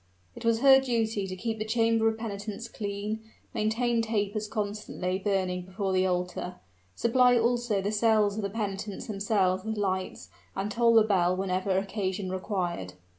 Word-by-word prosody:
It - - -9
was 230 0 +2
her 270 -1 +8
duty 225 -5 0
to 185 - -5
keep 220 +3 -3
the - - 0
chamber 225 0 +2
of 220 0 +1
penitence 215 0 -5
clean, 205 0 -4 0.3
maintain 230 +2 +1
tapers 215 -1 -1
constantly 205 -3 -3
burning 190 -2 0
before 190 +1 -3
the 185 0 +3
altar, 180 0 -2 0.4
supply 245 +1 +4
also 235 -3 +1
the 205 - 0
cells 215 -2 +3
of 220 - -2
the 200 - -2
penitents 200 -1 -4
themselves 195 -3 +1
with 220 0 -3
lights, 190 -2 -2 0.3
and 195 +2 -2
toll 230 +1 +4
the 225 - +8
bell 185 -4 +2
whenever 190 0 0
occasion 195 -1 -2
required. 180 - -3
205 Hz, 160 wpm, -28 LUFS, 190-225 Hz, 0.4 s, her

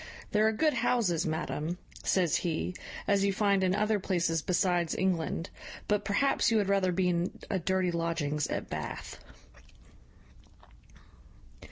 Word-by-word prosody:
`There 215 0 +4
are 220 - +4
good 300 +8 +2
houses, 225 -9 +1
madam,' 160 +1 -2 0.3
says 180 -5 +2
he, 175 +1 -2 0.3
`as 200 -1 +3
you 200 0 +3
find, 200 -1 +2
in 185 0 +2
other 210 0 +1
places 170 -4 0
besides 175 -1 +1
England; 175 -2 -1 0.4
but 210 -1 +1
perhaps 245 +7 +2
you 225 - +3
had 200 -2 +1
rather 195 -2 +2
be 180 +1 +1
in 175 0 -1
a 190 - +1
dirty 185 0 +1
lodgings 165 -3 -1
at - - -3
Bath.' - - -6
185 Hz, 140 wpm, -30 LUFS, 170-200 Hz, 0.4 s, `There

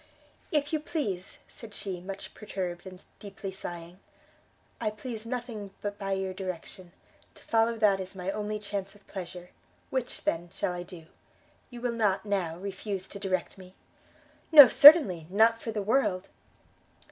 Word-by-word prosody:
"If 295 0 0
you 310 - +2
please," 210 - -4
said 220 -3 -12
she, 190 -3 -5
much 195 +2 -8
perturbed, 185 -4 -5
and 185 0 -12
deeply 195 -1 -7
sighing. 175 -1 -8 0.8
"I 220 - 0
please 220 +1 -7
nothing 230 -5 -6
but 205 0 -5
by 195 -1 -2
your 190 -1 -2
direction, 185 -1 -7 0.4
to - - -16
follow 230 0 +1
that 205 -3 +3
is 190 +1 -7
my 185 +1 -3
only 210 +1 -3
chance 200 -1 -5
of 205 - -21
pleasure. 180 -2 -8 0.4
Which, 260 -2 -3
then, 170 +1 -1
shall - - -1
I 175 - -5
do? 175 -2 -11 0.6
you 240 -2 -10
will 245 -1 -1
not, 210 -3 0
now, 185 -5 -1
refuse 195 0 -5
to 200 - -8
direct 185 -1 -3
me?" 185 0 -14 0.8
"No, 290 -4 +12
certainly, 230 - +8
not 225 +4 +3
for 225 - -4
the 210 -2 -3
world!" 195 -4 0
195 Hz, 160 wpm, -28 LUFS, 185-225 Hz, 0.8 s, No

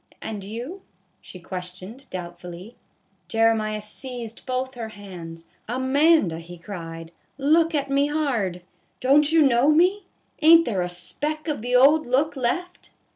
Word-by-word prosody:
And 210 -3 -6
you? 240 - -7 0.2
" - - -44
she 185 - -12
questioned, 185 +8 -8
doubtfully. 180 +3 -8 0.5
Jeremiah 225 -1 +1
seized 235 +2 -7
both 255 +1 -2
her 230 -3 -6
hands. 175 -6 -10
" - - -41
Amanda," 265 - +3
he 175 +1 -10
cried, 165 -2 -8 0.3
"look 320 +4 +3
at 280 -1 -1
me 280 +1 +3
hard. 240 - -1 0.4
Don't 290 +4 +4
you 325 -1 +5
know 260 0 +4
me? 365 +5 +3 0.3
Ain't 330 +2 +7
there 195 -5 -1
a 180 - -2
speck 295 - -4
of 295 -7 -2
the 245 +2 -1
old 290 +4 +5
look 280 +5 +1
left 315 +9 -3
240 Hz, 145 wpm, -24 LUFS, 185-295 Hz, 0.5 s, Ain't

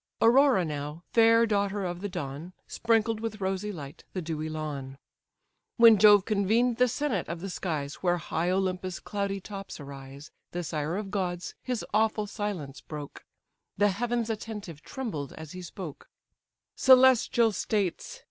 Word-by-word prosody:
Aurora 245 -4 +5
now, 150 +2 -5
fair 230 0 +6
daughter 200 -2 0
of 175 0 -4
the 205 - -3
dawn, 165 0 -6
Sprinkled 225 -1 +1
with 220 -1 -4
rosy 195 +2 -2
light 145 -7 -9
the 185 - -2
dewy 155 -1 -3
lawn; 145 -4 -5 0.8
When 230 -3 +8
Jove 205 -2 +7
convened 225 +3 +2
the 250 0 +4
senate 245 - -1
of 170 0 -4
the 195 +2 -5
skies, 150 -6 -3
Where 175 -1 +2
high 170 0 -2
Olympus' 185 -1 -1
cloudy 200 -1 -3
tops 195 -1 -8
arise, 140 0 -10 0.2
The 175 0 -2
sire 155 +2 -2
of 200 -2 -5
gods 180 -3 -2
his 250 -3 -3
awful 215 0 +2
silence 200 -10 -5
broke; 150 -2 -8 0.5
The 205 +1 +4
heavens 235 +3 -1
attentive 210 -8 -6
trembled 185 - -5
as 160 -1 -9
he 185 - -7
spoke: 175 -3 -8 0.7
"Celestial 255 -3 +5
states! 205 - -2
195 Hz, 150 wpm, -28 LUFS, 160-220 Hz, 0.8 s, When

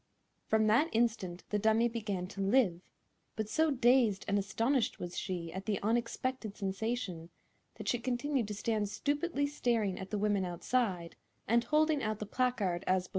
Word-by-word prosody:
From 220 0 +3
that 235 +10 +4
instant 220 -6 0
the 210 - +1
dummy 220 +2 +3
began 210 -6 -3
to 195 - -6
live, 195 -4 +3 0.5
but 220 -1 -2
so 315 +8 +2
dazed 245 -6 +3
and 200 0 +2
astonished 230 +6 0
was 175 0 -6
she 175 -4 -4
at 190 +2 -6
the 205 -3 0
unexpected 235 0 -1
sensation 195 -4 -3 0.5
that - - -8
she 245 - +1
continued 255 0 -1
to 210 - -4
stand 210 -1 -1
stupidly 290 +5 -1
staring 235 -9 0
at 190 0 -7
the 210 - -2
women 205 -1 +1
outside 180 0 -1 0.3
and 235 +2 +3
holding 305 -1 +2
out 215 -2 -1
the 215 - -5
placard 210 -7 0
as 185 0 +2
before. - - -15
220 Hz, 170 wpm, -32 LUFS, 195-245 Hz, 0.5 s, that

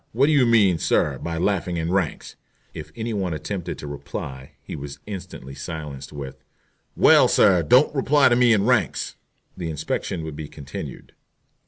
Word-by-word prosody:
What 130 +5 +4
do 155 - +2
you 140 -5 +4
mean, 100 -7 +4
sir, - - +1
by 85 0 -4
laughing 90 -1 0
in 80 +1 -2
ranks?" 95 -5 -2 0.4
If - - -8
any 115 0 -3
one 95 -5 -2
attempted 95 +3 -5
to - - -8
reply 70 -2 -7
he - - -7
was 70 -1 -7
instantly 95 -9 -8
silenced 75 -1 -7
with 70 -2 -8 0.5
"Well, - - +6
sir, 95 -4 +4
don't 125 - +4
reply 145 0 +4
to 120 - +3
me 125 -1 +4
in 105 -2 +3
ranks." 125 -2 +1 0.4
The 85 -3 -4
inspection 80 +1 -3
would 80 -2 -6
be 75 0 -6
continued. 70 -1 -9
85 Hz, 170 wpm, -23 LUFS, 75-110 Hz, 0.5 s, Well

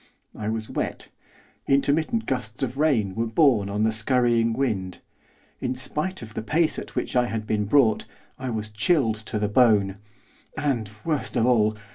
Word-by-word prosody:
I 105 0 -4
was 110 0 -3
wet, - - -4 0.6
intermittent 155 - +1
gusts 125 -3 -3
of 130 +1 -3
rain 120 -11 +2
were 115 +3 -1
borne 115 -5 +3
on 105 +2 -1
the 110 - +3
scurrying 115 0 +2
wind; 110 -7 -2 0.6
in 125 0 -2
spite 150 +6 0
of 110 -1 -10
the - - -4
pace 155 +8 +1
at - - -10
which - - -2
I 125 -1 +3
had 110 -2 -4
been 105 -1 0
brought, 110 -2 +3 0.3
I 130 -1 -4
was 110 -2 -3
chilled 110 +1 +1
to - - -2
the 105 0 0
bone; 105 -4 +3 0.6
and 120 -8 -1 0.2
worst 155 -3 -2
of 115 - +2
all! 110 -3 +3
115 Hz, 170 wpm, -24 LUFS, 110-135 Hz, 0.6 s, borne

